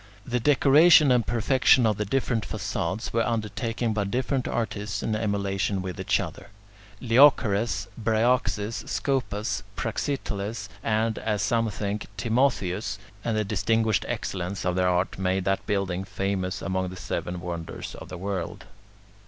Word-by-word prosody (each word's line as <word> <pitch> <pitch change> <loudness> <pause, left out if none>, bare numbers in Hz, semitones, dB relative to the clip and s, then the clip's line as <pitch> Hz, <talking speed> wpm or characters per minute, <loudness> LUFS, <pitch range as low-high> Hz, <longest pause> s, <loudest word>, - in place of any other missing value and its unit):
The 125 0 -1
decoration 145 +3 +6
and 125 -2 +3
perfection 120 +1 +4
of 105 -2 +2
the 105 - -1
different 120 0 0
facades 95 +3 -3
were 115 - +2
undertaken 115 +1 -1
by 105 -1 0
different 130 +5 -1
artists 105 -3 -2
in 110 - 0
emulation 100 -2 -1
with 90 -2 -5
each - - +1
other: - - -6 0.5
Leochares, 115 -4 +4 0.2
Bryaxis, 115 -1 +1
Scopas, 125 -6 -1
Praxiteles, 105 -6 -3
and, 110 0 0
as 105 -3 -1
some 115 +2 +1
think, 105 0 -3
Timotheus; 110 -4 0 0.3
and 115 -2 0
the 110 - +2
distinguished 110 +2 +1
excellence 95 +1 -3
of 90 -1 +1
their 90 0 +2
art 90 +1 0
made 95 0 0
that 95 0 0
building 95 -2 -1
famous 95 -1 -2
among 95 -1 -1
the 90 - -8
seven 90 0 -4
wonders 85 -2 -6
of - - -10
the 90 - -6
world. 95 -1 -4
105 Hz, 140 wpm, -26 LUFS, 95-115 Hz, 0.5 s, decoration